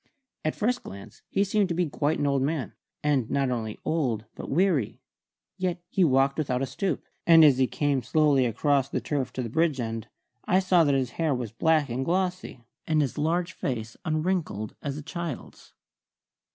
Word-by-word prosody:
At 155 - -1
first 245 +3 0
glance 100 +1 -11
he 200 - +2
seemed 200 -1 +1
to 170 - -1
be 175 0 +1
quite 150 +2 0
an - - 0
old 140 -1 +2
man, 145 0 -2 0.3
and 140 -6 +1
not 135 -2 +1
only 110 -3 -3
old 125 -9 0
but - - -8
weary; 160 - +1 0.6
yet 180 -1 -1
he 190 - +2
walked 135 -1 +3
without 130 -3 0
a - - +1
stoop, 165 +9 -3 0.2
and 165 -2 +8
as 135 -3 +5
he 130 - +4
came 145 -1 0
slowly 140 0 +3
across 135 +3 +1
the - - -1
turf 140 -3 -2
to 130 - -3
the - - -3
bridge 160 +1 +1
end 115 -2 -4 0.4
I 185 - +3
saw 185 -2 +4
that 140 -1 +3
his 130 -2 0
hair 155 -4 +2
was 120 -3 -4
black 155 +4 +2
and 125 +3 -2
glossy, 180 -6 -2 0.2
and 155 -1 +2
his 140 -5 -1
large 170 +4 0
face 115 -7 -4
unwrinkled 155 - -1
as 140 -1 -4
a 150 - -7
child's. 170 -3 -7
145 Hz, 190 wpm, -27 LUFS, 130-170 Hz, 0.6 s, and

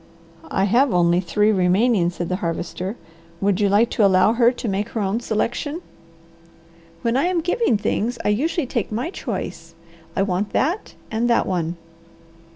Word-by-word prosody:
"I 190 - 0
have 240 +7 +3
only 175 0 +3
three 210 +4 +2
remaining," 190 0 +3
said 175 0 -4
the 185 - -1
Harvester. 180 +3 -4 0.4
"Would 200 +1 +1
you 200 - +3
like 215 +4 +3
to 220 - +2
allow 190 +2 +5
her 235 0 +4
to 245 - -6
make 205 +2 -1
her 225 - -4
own 200 +3 0
selection?" 240 +7 -2 1.2
"When 230 0 +1
I'm 345 +6 +2
giving 355 - +1
things 230 +3 -1
I - - +3
usually 295 +9 0
take 235 -4 -3
my 245 +11 -2
choice. - - -6 0.4
I 195 - +2
want 195 +1 -2
that, 345 +10 -1 0.2
and 230 +2 0
that 235 - +3
one." 175 -2 -2
210 Hz, 160 wpm, -22 LUFS, 190-240 Hz, 1.2 s, allow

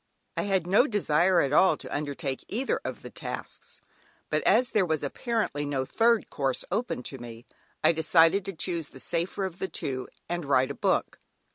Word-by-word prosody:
I - - -1
had 190 -3 +2
no 200 +9 +4
desire 180 - +3
at 140 0 0
all 190 +5 +5
to - - -6
undertake 145 -2 -3
either 250 +6 -1
of - - -6
the - - -8
tasks, - - -7 0.5
but - - +2
as 255 0 +4
there 210 - +3
was 160 -4 -1
apparently 210 - -1
no 140 -2 -1
third 230 - +2
course 135 -2 -1
open 205 - -2
to 135 - -7
me, 120 0 -10 0.4
I - - +6
decided 165 +3 +4
to 195 - -4
choose 165 -2 -2
the 130 - -14
safer 175 +7 -2
of 185 -1 -6
the 190 - -1
two, 130 -6 -3 0.2
and 175 0 -2
write 130 -2 +2
a - - -3
book. - - 0
165 Hz, 185 wpm, -28 LUFS, 140-195 Hz, 0.5 s, I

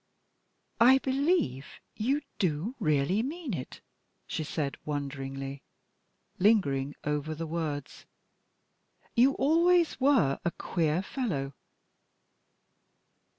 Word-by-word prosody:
"I 255 +3 +8
believe 270 - 0 0.2
you 270 +7 0 0.2
do 180 +4 0
really 155 +7 +2
mean 290 - -4
it," 130 -7 -6 0.4
she 155 - -3
said, 150 -2 -3
wonderingly, 135 -1 -4 0.8
lingering 145 -10 +2
over 150 +1 -2
the 165 +2 -4
words; 155 -3 -4 1.1
"you 255 +4 +5
always 335 +3 +3
were 255 - +3
a 175 - +1
queer 170 0 -1
fellow." 175 - -3
165 Hz, 90 wpm, -29 LUFS, -, 1.1 s, I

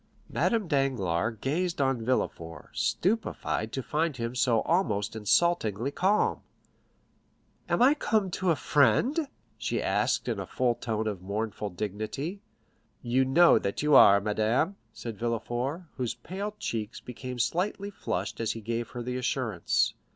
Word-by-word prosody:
Madame 225 -5 +1
Danglars 115 - 0
gazed 170 +5 -1
on 135 -3 +1
Villefort, 85 -9 -2
stupefied 190 - -1
to 135 - -3
find 155 0 -1
him 115 0 -3
so 125 -3 +2
almost 110 - 0
insultingly 115 - +2
calm. 195 +7 +1 1.3
"Am - - +3
I 270 +3 +7
come 215 -9 0
to 185 +1 -1
a 165 - +4
friend?" 150 - +2 0.3
she - - -1
asked - - 0
in - - -1
a - - -5
tone 125 -2 +1
full 110 -2 -1
of 100 -4 -3
mournful 105 +2 -3
dignity. 110 - -4 0.6
"You 125 +2 +2
know 165 +6 +6
that 100 +8 -3
you 150 0 +3
are, 100 -6 +8
madame," 110 - +1 0.2
said 115 -4 -7
Villefort, 120 +7 -2
whose 125 -3 -2
pale 200 +4 -5
cheeks 115 - -4
became 125 +1 -7
slightly 195 - -1
flushed 100 - -3
as 110 -1 0
he 115 - -7
gave 115 +1 -3
her 120 -1 -6
the 125 +1 -3
assurance. 120 -7 0
125 Hz, 145 wpm, -28 LUFS, 110-170 Hz, 1.3 s, are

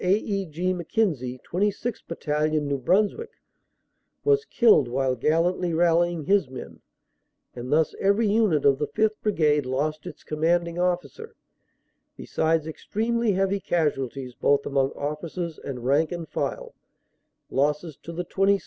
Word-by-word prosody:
A. 185 +2 +4
E. 200 -2 -2
G. 175 +4 -1
Mc 175 -3 -7
Kenzie, 135 - 0
26th 205 +5 -2
Battalion, 155 -2 -1
New 140 -1 -1
Brunswick, 210 - +1 0.9
was 430 0 +3
killed 225 - +4
while 130 +1 0
gallantly 165 +6 +1
rallying 170 0 +2
his 195 -3 +2
men, 130 -1 -9 0.7
and 125 +1 -7
thus 155 +1 +3
every 200 +3 +2
unit 205 -8 +2
of 140 -1 +4
the 150 - -1
5th. 215 0 0
Brigade 150 -9 +2
lost 150 +4 -2
its - - -10
commanding 170 +2 0
officer, 180 - -2 0.8
besides 160 -1 0
extremely 225 +7 -1
heavy 195 +1 +1
casualties 135 -7 -1
both 140 +3 +2
among 135 -1 +1
officers 160 +3 -4
and 125 -3 -6
rank 145 +5 +2
and 170 -2 -5
file, - - -3 0.8
losses 150 +3 0
to 170 - -9
the 175 +1 -4
26th. 195 +2 +2
170 Hz, 140 wpm, -25 LUFS, 150-195 Hz, 0.9 s, A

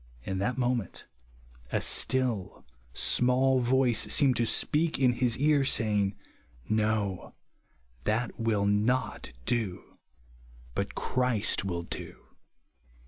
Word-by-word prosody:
In 95 -1 -3
that 120 +6 -1
moment, 120 -6 -2 0.7
a - - +1
still 120 -6 0 0.3
small 130 - +2
voice 125 -2 +2
seemed 135 -3 +3
to 115 - +1
speak 155 +7 +1
in 130 -2 +4
his 120 -1 +1
ear, 145 0 +3
say 110 -5 +1
ing, 100 -1 +1 0.3
" - - -33
No, 110 -3 -1 0.7
that 110 +3 -1
will 110 -3 +1
not 105 +6 0
do; 110 -7 -3 0.7
but - - -3
Christ 125 -7 0
will 85 -3 -3
do." - - -9
120 Hz, 115 wpm, -29 LUFS, 105-130 Hz, 0.7 s, in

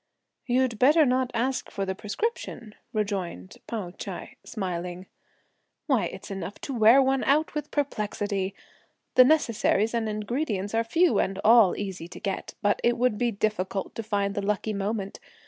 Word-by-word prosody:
"You'd 245 -3 +1
better 300 +4 +6
not 255 -1 +1
ask 255 +3 -1
for 195 - -3
the 190 - -2
prescription," 220 - -4 0.2
rejoined 195 - -3
Pao 205 -6 -4
Ch'ai - - -8
smiling. 180 -3 -4 0.8
"Why, - - +2
its - - -7
enough 195 0 -5
to 275 - -4
wear 230 +2 +6
one 265 0 +1
out 300 +3 +2
with 300 -1 -4
perplexity! 205 -7 -2 0.6
the 255 - +8
necessaries 230 -6 +2
and 225 -2 0
ingredients 210 -1 -2
are 225 0 +2
few, 330 +10 +3
and 195 0 -1
all 225 -4 +7
easy 190 -4 -5
to 180 - -10
get, 195 -1 -4
but 205 0 +2
it 240 0 +3
would 240 -3 +1
be 245 - +2
difficult 200 -3 -2
to - - -4
find 200 -2 -1
the 205 - -2
lucky 210 +2 -1
moment! 200 0 -3
215 Hz, 160 wpm, -26 LUFS, 195-250 Hz, 0.8 s, the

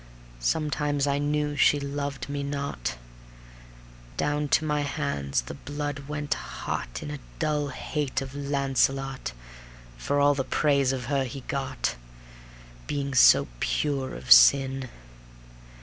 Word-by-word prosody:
Sometimes 145 - 0
I 140 0 +1
knew 150 0 0
she 145 +1 +4
loved 140 0 -4
me 140 0 -3
not; 140 - -3 1.2
Down 145 0 0
to 155 - +2
my 150 -1 0
hands 140 - -1
the - - -7
blood 145 - -5
went 150 -1 -2
hot - - -5
In 150 - -5
a 150 - -6 0.2
dull 150 -2 0
hate 140 +1 -3
of 135 -1 -7
Launcelot 135 - 0 0.7
For 145 0 0
all 145 0 +5
the 135 -1 -1
praise 140 -1 +2
of 130 -2 -3
her 140 +1 +1
he 130 +2 -7
got, 135 -2 -3 0.9
Being 140 -1 -2
so 130 - +7
pure 140 - -1
of 60 0 -8
sin. 135 - +7
140 Hz, 130 wpm, -27 LUFS, 135-145 Hz, 1.2 s, so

